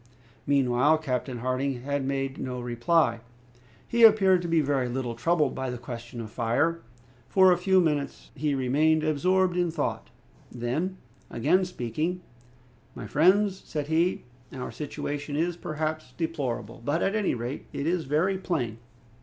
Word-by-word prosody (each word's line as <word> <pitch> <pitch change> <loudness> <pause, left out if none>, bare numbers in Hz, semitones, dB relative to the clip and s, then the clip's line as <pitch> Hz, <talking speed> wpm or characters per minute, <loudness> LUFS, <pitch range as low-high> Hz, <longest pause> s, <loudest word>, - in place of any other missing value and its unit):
Meanwhile 140 +2 +3
Captain 130 -4 -3
Harding 130 0 -1
had 140 0 -1
made 135 0 -2
no 125 -1 -4
reply. 120 +2 +1 0.7
He 235 - 0
appeared 195 -5 +7
to 175 - -4
be 165 -1 +3
very 135 -4 0
little 125 -1 -3
troubled 150 +3 +1
by 130 -1 -3
the 125 - -4
question 120 0 -8
of 110 -2 -6
fire. 135 +9 0 0.5
For 190 -1 +6
a 175 - +4
few 190 +1 +4
minutes 150 -5 -1
he 145 +1 -1
remained 150 +5 +2
absorbed 180 +4 +2
in 175 -1 +1
thought; 165 - -3 0.4
then 140 +11 -2 0.3
again 165 +11 +2
speaking, 165 +3 -3 0.7
"My - - -7
friends," 190 +5 +3
said 150 -1 -4
he, 165 +3 +1 0.3
"our 130 -1 -6
situation 145 0 -5
is, 170 +3 0
perhaps, 155 -4 -4
deplorable; 135 -10 -3
but, 145 +6 0
at 195 - +1
any 210 -8 +1
rate, 120 +3 -5
it 140 - -4
is 170 0 0
very 170 +7 +1
plain. 125 - -2
145 Hz, 150 wpm, -27 LUFS, 125-175 Hz, 0.7 s, appeared